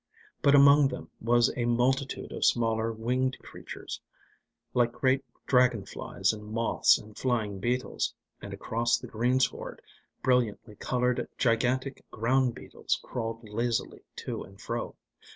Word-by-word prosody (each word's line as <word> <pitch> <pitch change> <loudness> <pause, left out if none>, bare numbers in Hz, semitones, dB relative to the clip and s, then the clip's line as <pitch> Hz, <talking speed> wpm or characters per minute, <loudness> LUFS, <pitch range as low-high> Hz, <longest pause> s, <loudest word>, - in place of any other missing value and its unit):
But 140 0 +5
among 140 0 +7
them 125 -1 -7
was 120 +1 +3
a 120 - -1
multitude 130 +3 0
of - - -4
smaller 115 -1 +2
winged 125 +4 -1
creatures, - - -9 0.7
like 120 -1 +2
great 130 +1 +1 0.2
dragon 125 -5 +3
flies - - -1
and 105 -1 -8
moths 115 +1 +3
and 105 0 -13
flying 110 -6 -1
beetles, 125 +5 -1 0.3
and - - -7
across 115 +1 0
the - - -9
greensward 125 +4 0 0.4
brilliantly 120 -4 +1
coloured 125 -1 0
gigantic 125 +3 +1
ground 125 +2 +1
beetles - - -3
crawled 115 -1 -5
lazily 115 +2 -2 0.2
to - - -3
and 95 +1 -12
fro. - - -4
120 Hz, 130 wpm, -29 LUFS, 115-130 Hz, 0.7 s, among